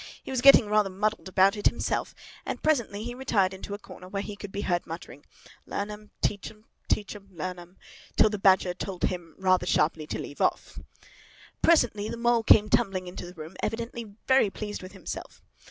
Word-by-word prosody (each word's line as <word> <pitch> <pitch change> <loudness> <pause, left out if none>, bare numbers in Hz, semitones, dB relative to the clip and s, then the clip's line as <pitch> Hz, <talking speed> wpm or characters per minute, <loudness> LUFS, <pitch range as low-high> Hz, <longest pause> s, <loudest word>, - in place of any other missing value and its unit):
He - - -7
was 260 -2 0
getting 275 -3 +8
rather 210 -1 +3
muddled 210 +2 -1
about 190 +2 +4
it 205 - +2
himself, - - -1 0.3
and - - -5
presently 235 -9 +1
he 240 +1 -5
retired 220 -7 +1
into 200 +2 -6
a - - -7
corner, 185 -3 -12
where 195 +1 -3
he 205 0 -6
could 200 -1 -8
be 200 - -3
heard 175 -3 -1
muttering, 160 -3 -8 0.4
"Learn 205 +1 -3
'em, 210 0 -10
teach 200 -2 -1
'em, 215 0 -18 0.2
teach 205 0 -1
'em, 200 -1 -13
learn 180 +1 -5
'em!" 175 +2 -14 0.4
till 215 - +5
the 210 - -3
Badger 190 -2 +4
told 185 0 -6
him 170 -4 -2
rather 185 -1 +2
sharply 155 -2 +1
to - - -3
leave 145 - -7
off. - - 0 0.8
Presently 230 -10 +3
the - - -5
Mole 235 0 +3
came 215 -1 +6
tumbling 195 -4 +1
into 180 0 -7
the 180 - -11
room, 160 +1 -9
evidently 230 -2 -4
very 260 -5 +4
pleased 205 +1 -6
with 185 0 -10
himself. - - -8
200 Hz, 200 wpm, -27 LUFS, 185-215 Hz, 0.8 s, getting